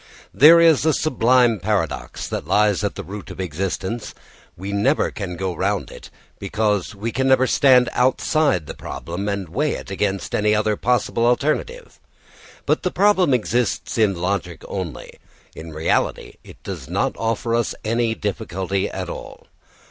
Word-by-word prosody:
There 160 Hz, +5 st, +8 dB
is 165 Hz, -4 st, +5 dB
a 160 Hz, 0 st, +3 dB
sublime 125 Hz, -5 st, +3 dB
paradox 105 Hz, +2 st, -2 dB
that -, -, -5 dB
lies 105 Hz, -1 st, +2 dB
at 105 Hz, -, -2 dB
the -, -, -6 dB
root 100 Hz, +1 st, -8 dB
of -, -, -10 dB
existence. 95 Hz, +5 st, -4 dB, 0.4 s
We 95 Hz, +3 st, -6 dB
never 125 Hz, +9 st, +1 dB
can 95 Hz, -4 st, -5 dB
go 95 Hz, +1 st, -3 dB
round 100 Hz, +3 st, -1 dB
it, -, -, -12 dB, 0.3 s
because 105 Hz, -1 st, -1 dB
we 110 Hz, +4 st, -4 dB
never 130 Hz, +1 st, +3 dB
can -, -, -1 dB
stand 125 Hz, -3 st, +5 dB
outside 130 Hz, -, +1 dB
the -, -, -7 dB
problem 95 Hz, +5 st, -5 dB
and 100 Hz, -2 st, -3 dB
weigh 145 Hz, -, -1 dB
it -, -, -7 dB
against 95 Hz, 0 st, -2 dB
any 105 Hz, 0 st, +2 dB
other 105 Hz, 0 st, +1 dB
possible 120 Hz, 0 st, +1 dB
alternative. 155 Hz, -, -1 dB, 0.7 s
But -, -, +1 dB
the 180 Hz, -, 0 dB
problem 190 Hz, -4 st, +3 dB
exists 120 Hz, -2 st, 0 dB
in 105 Hz, -3 st, +3 dB
logic 90 Hz, -2 st, -3 dB
only; 90 Hz, -9 st, -6 dB, 0.4 s
in 80 Hz, 0 st, -9 dB
reality 80 Hz, +1 st, -1 dB
it -, -, -15 dB
does -, -, -7 dB
not -, -, -1 dB
offer 115 Hz, +1 st, -2 dB
us 115 Hz, -1 st, 0 dB
any 115 Hz, 0 st, 0 dB
difficulty 95 Hz, -3 st, -2 dB
at -, -, -5 dB
all. -, -, -9 dB
105 Hz, 155 wpm, -21 LUFS, 95-125 Hz, 0.7 s, There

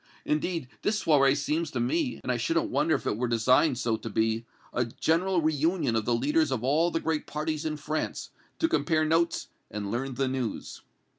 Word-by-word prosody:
Indeed, 155 Hz, -1 st, -1 dB
this 210 Hz, 0 st, 0 dB
soirée 140 Hz, -2 st, +4 dB
seems 155 Hz, +3 st, -1 dB
to 130 Hz, -, -3 dB
me, 125 Hz, -1 st, 0 dB
and -, -, -1 dB
I 125 Hz, -, 0 dB
shouldn't 165 Hz, +8 st, 0 dB
wonder 150 Hz, +4 st, +2 dB
if -, -, -4 dB
it 105 Hz, -, 0 dB
were 125 Hz, +2 st, 0 dB
designed 125 Hz, +4 st, +3 dB
so 115 Hz, -2 st, 0 dB
to 115 Hz, -, -7 dB
be, 110 Hz, +2 st, 0 dB, 0.3 s
a 120 Hz, -, +1 dB
general 165 Hz, +9 st, +1 dB
reunion 155 Hz, -3 st, +1 dB
of 110 Hz, -1 st, 0 dB
the 120 Hz, -, +2 dB
leaders 150 Hz, +6 st, +2 dB
of 130 Hz, -3 st, -2 dB
all 155 Hz, +6 st, +3 dB
the 165 Hz, -, -1 dB
great 160 Hz, -2 st, -2 dB
parties 155 Hz, +1 st, -3 dB
in 155 Hz, -1 st, -2 dB
France, 155 Hz, +1 st, -3 dB, 0.3 s
to 325 Hz, -, +2 dB
compare 155 Hz, -, +1 dB
notes 165 Hz, +2 st, +1 dB, 0.2 s
and 100 Hz, -1 st, -4 dB
learn 130 Hz, +2 st, -2 dB
the 135 Hz, 0 st, 0 dB
news." 130 Hz, -3 st, -4 dB
145 Hz, 200 wpm, -28 LUFS, 120-160 Hz, 0.3 s, soirée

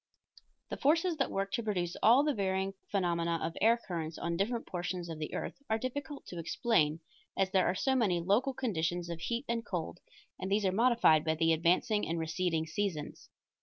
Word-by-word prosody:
The -, -, -4 dB
forces 330 Hz, +4 st, +2 dB
that 275 Hz, -, 0 dB
work 195 Hz, 0 st, -2 dB
to 235 Hz, -, -1 dB
produce 180 Hz, -6 st, -2 dB
all 240 Hz, +6 st, +6 dB
the 300 Hz, -1 st, +1 dB
varying 195 Hz, -2 st, -1 dB, 0.2 s
phenomena 170 Hz, -3 st, 0 dB
of 165 Hz, +1 st, -3 dB
air 230 Hz, +2 st, +5 dB
currents 165 Hz, -3 st, -4 dB
on 170 Hz, 0 st, -2 dB
different 230 Hz, +6 st, -1 dB
portions 175 Hz, -1 st, -4 dB
of 160 Hz, -1 st, -6 dB
the 155 Hz, -, -4 dB
earth -, -, -3 dB, 0.2 s
are 220 Hz, -, +2 dB
difficult 265 Hz, +4 st, -5 dB
to 175 Hz, -, -7 dB
explain, 165 Hz, -, +1 dB, 0.4 s
as 190 Hz, -1 st, +1 dB
there 190 Hz, -2 st, +3 dB
are 180 Hz, -, +1 dB
so 265 Hz, +7 st, +1 dB
many 210 Hz, -9 st, +2 dB
local 220 Hz, +10 st, +1 dB
conditions 175 Hz, -7 st, -1 dB
of 165 Hz, -, -5 dB
heat 235 Hz, +9 st, -2 dB
and 230 Hz, -1 st, -1 dB
cold, 175 Hz, -4 st, -4 dB, 0.4 s
and 190 Hz, +1 st, -4 dB
these 205 Hz, 0 st, +2 dB
are 190 Hz, -, +3 dB
modified 225 Hz, -8 st, +4 dB
by 160 Hz, 0 st, +1 dB
the 165 Hz, +1 st, +3 dB
advancing 180 Hz, +6 st, +2 dB
and 165 Hz, +2 st, -1 dB
receding 160 Hz, 0 st, -1 dB
seasons. 165 Hz, -3 st, -4 dB
190 Hz, 195 wpm, -32 LUFS, 170-230 Hz, 0.4 s, all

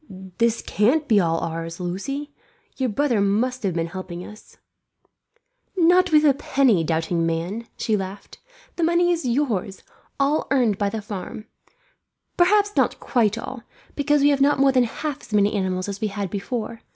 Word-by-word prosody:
"This 230 Hz, 0 st, +1 dB
can't 270 Hz, +9 st, +1 dB
be 215 Hz, -3 st, +4 dB
all 165 Hz, -2 st, +1 dB
ours, 165 Hz, +1 st, -5 dB
Lucie. 275 Hz, +12 st, -4 dB, 0.4 s
Your 260 Hz, -2 st, -1 dB
brother 240 Hz, -1 st, +1 dB
must 230 Hz, +6 st, 0 dB
have 190 Hz, -5 st, -1 dB
been 165 Hz, -1 st, 0 dB
helping 180 Hz, 0 st, -7 dB
us." 210 Hz, +1 st, -14 dB, 1.2 s
"Not 360 Hz, +1 st, +4 dB
with 305 Hz, 0 st, +5 dB
a 285 Hz, -, +6 dB
penny, 260 Hz, -9 st, +2 dB
doubting 165 Hz, +1 st, 0 dB
man," 170 Hz, +8 st, -2 dB
she 220 Hz, -, 0 dB
laughed. 195 Hz, 0 st, -6 dB, 0.4 s
"The 340 Hz, -, 0 dB
money 345 Hz, +1 st, +3 dB
is 335 Hz, -6 st, -1 dB
yours, 235 Hz, -7 st, -1 dB, 0.4 s
all 280 Hz, +3 st, +1 dB
earned 240 Hz, -7 st, +2 dB
by 205 Hz, -1 st, +1 dB
the 220 Hz, 0 st, -5 dB
farm; 205 Hz, +1 st, -7 dB, 0.9 s
perhaps 410 Hz, +3 st, +3 dB
not -, -, +1 dB
quite 225 Hz, -4 st, +1 dB
all, 240 Hz, +1 st, -6 dB, 0.3 s
because 295 Hz, 0 st, +2 dB
we 290 Hz, -, +6 dB
have 280 Hz, -1 st, +1 dB
not 285 Hz, +1 st, +4 dB
more 275 Hz, 0 st, +4 dB
than 255 Hz, -2 st, +3 dB
half 285 Hz, +4 st, -5 dB
as -, -, -12 dB
many 205 Hz, 0 st, +3 dB
animals 185 Hz, -2 st, -1 dB
as 200 Hz, +2 st, -6 dB
we 215 Hz, -, +1 dB
had 200 Hz, -2 st, -4 dB
before. 225 Hz, +2 st, -4 dB
225 Hz, 170 wpm, -23 LUFS, 195-280 Hz, 1.2 s, a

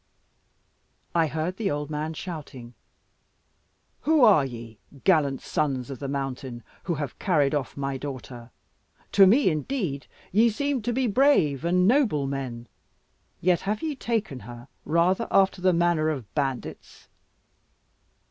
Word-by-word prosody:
I 165 Hz, -2 st, +3 dB
heard 160 Hz, +4 st, -3 dB
the 215 Hz, -4 st, -1 dB
old 145 Hz, +1 st, -3 dB
man 155 Hz, +2 st, -3 dB
shouting, 145 Hz, -9 st, -8 dB, 1.3 s
"Who 305 Hz, -1 st, +3 dB
are 200 Hz, -, +7 dB
ye 115 Hz, -4 st, -8 dB, 0.2 s
gallant 145 Hz, -7 st, +3 dB
sons 135 Hz, -4 st, -2 dB
of 135 Hz, -, -7 dB
the 140 Hz, -, -4 dB
mountain, 135 Hz, -3 st, -4 dB, 0.2 s
who 175 Hz, -, -1 dB
have 145 Hz, -3 st, -5 dB
carried 150 Hz, -7 st, +2 dB
off 145 Hz, -3 st, -2 dB
my 135 Hz, -1 st, -2 dB
daughter? 125 Hz, -3 st, -8 dB, 0.6 s
To 195 Hz, -1 st, +7 dB
me, 235 Hz, +2 st, +5 dB
indeed, 155 Hz, -, -3 dB, 0.2 s
ye 225 Hz, +5 st, +4 dB
seem 280 Hz, +3 st, -1 dB
to 240 Hz, -, -1 dB
be 260 Hz, +2 st, 0 dB
brave 205 Hz, -, +3 dB
and 180 Hz, +2 st, +3 dB
noble 220 Hz, -, +3 dB
men, 130 Hz, -4 st, -5 dB, 0.7 s
yet 180 Hz, 0 st, +2 dB
have 215 Hz, +5 st, -2 dB
ye 310 Hz, -2 st, -2 dB
taken 220 Hz, -, -2 dB
her 120 Hz, +3 st, -11 dB, 0.2 s
rather 175 Hz, +7 st, +2 dB
after 195 Hz, -1 st, +3 dB
the 185 Hz, 0 st, +4 dB
manner 170 Hz, -2 st, +2 dB
of 135 Hz, -9 st, -5 dB
bandits. 135 Hz, -4 st, -4 dB
155 Hz, 140 wpm, -26 LUFS, 135-195 Hz, 1.3 s, are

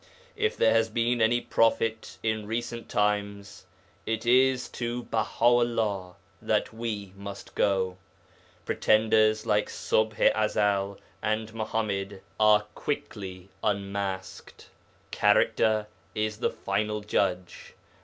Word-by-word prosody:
If -, -, 0 dB
there 110 Hz, -, +4 dB
has 115 Hz, 0 st, +3 dB
been 115 Hz, +1 st, 0 dB
any 115 Hz, +2 st, +4 dB
prophet 115 Hz, -1 st, +1 dB
in 110 Hz, -2 st, -1 dB
recent 115 Hz, +1 st, -4 dB
times, 100 Hz, -2 st, -1 dB, 0.4 s
it 110 Hz, +1 st, -2 dB
is 130 Hz, +1 st, +4 dB
to 120 Hz, 0 st, -4 dB
Baha 115 Hz, +1 st, -1 dB
'ullah 115 Hz, -6 st, +2 dB, 0.3 s
that -, -, 0 dB
we 105 Hz, -4 st, -4 dB
must 100 Hz, 0 st, -9 dB
go. 95 Hz, -2 st, +1 dB, 0.7 s
Pretenders 110 Hz, 0 st, +3 dB
like 105 Hz, 0 st, +2 dB
Ṣubḥ 110 Hz, 0 st, 0 dB, 0.2 s
i 110 Hz, 0 st, +2 dB
Ezel 100 Hz, -2 st, 0 dB, 0.2 s
and 110 Hz, +1 st, -2 dB
Muḥammad 105 Hz, -3 st, -3 dB, 0.2 s
are 105 Hz, -1 st, +5 dB
quickly 95 Hz, -9 st, -5 dB
unmasked. 100 Hz, -2 st, -3 dB, 0.4 s
Character 110 Hz, -1 st, +3 dB, 0.3 s
is 110 Hz, 0 st, -2 dB
the -, -, +1 dB
final 105 Hz, 0 st, -2 dB
judge. 95 Hz, -3 st, -2 dB
110 Hz, 110 wpm, -27 LUFS, 100-115 Hz, 0.7 s, are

